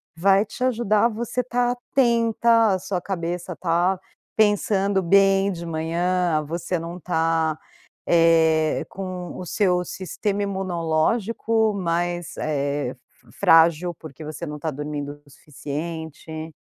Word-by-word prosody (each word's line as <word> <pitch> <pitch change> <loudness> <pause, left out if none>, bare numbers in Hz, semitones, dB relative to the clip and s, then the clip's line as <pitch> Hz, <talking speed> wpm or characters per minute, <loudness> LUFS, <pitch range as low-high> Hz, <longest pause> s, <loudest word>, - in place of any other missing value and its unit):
vai 195 +5 +4
te 250 - -6
ajudar 230 -4 +2
a 235 - +4
você 235 +3 -3
tá 245 0 0
atenta, 235 -3 +2
a - - +1
sua 185 0 -3
cabeça 175 -1 -4
tá 175 +2 +1 0.4
pensando 200 -2 +2
bem 195 +2 +4
de 170 -2 -6
manhã, 165 0 0
você 170 +3 -3
não 170 +2 -6
tá, 160 -2 0 0.5
eh, 160 -2 +3
com 185 -2 -6
o - - -6
seu 180 -4 +1
sistema 195 +3 -3
imunológico 200 +4 0
mais, 175 -2 -2
eh, 140 -3 -2 0.4
frágil, 165 +1 +4
porque 155 -1 -11
você 155 +2 -6
não 150 -1 -6
tá 160 - -2
dormindo 145 0 -5
o - - -20
suficiente. 160 +2 -7
175 Hz, 120 wpm, -23 LUFS, 160-200 Hz, 0.5 s, vai